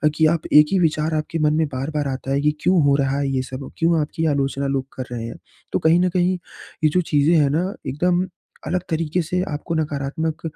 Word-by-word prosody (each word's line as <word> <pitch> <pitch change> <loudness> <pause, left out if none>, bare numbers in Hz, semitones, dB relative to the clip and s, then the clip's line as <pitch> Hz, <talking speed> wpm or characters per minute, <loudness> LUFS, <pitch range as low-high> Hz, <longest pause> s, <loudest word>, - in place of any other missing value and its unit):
कि 160 - +3
आप 165 - -3
एक 150 0 +8
ही 195 - +3
विचार 160 -1 +1
आपके 155 +1 -2
मन 150 -1 +3
में 160 0 +2
बार-बार 145 +2 -3
आता 135 0 -4
है 140 +1 +1
कि 150 +1 +3
क्यों 180 -2 +3
हो 140 -1 +4
रहा 135 0 +1
है 140 -1 0
ये 135 -1 0
सब? 130 +1 -7
क्यों 165 0 +2
आपकी 160 +2 -2
आलोचना 140 -2 0
लोग 135 -1 -1
कर 130 - -4
रहे 120 -2 -4
हैं, 115 - -6 0.4
तो - - +1
कहीं 165 +2 +4
न 180 0 +2
कहीं 180 0 +1 0.5
ये 155 - +5
जो 180 +4 +2
चीज़ें 150 0 +2
हैं 145 -3 +4
ना 175 +7 0
एकदम 175 +6 +1 0.4
अलग 180 - 0
तरीके 165 +2 0
से 180 +3 -1
आपको 150 +3 -3
नकारात्मक 155 +1 -2
150 Hz, 225 wpm, -21 LUFS, 140-165 Hz, 0.5 s, एक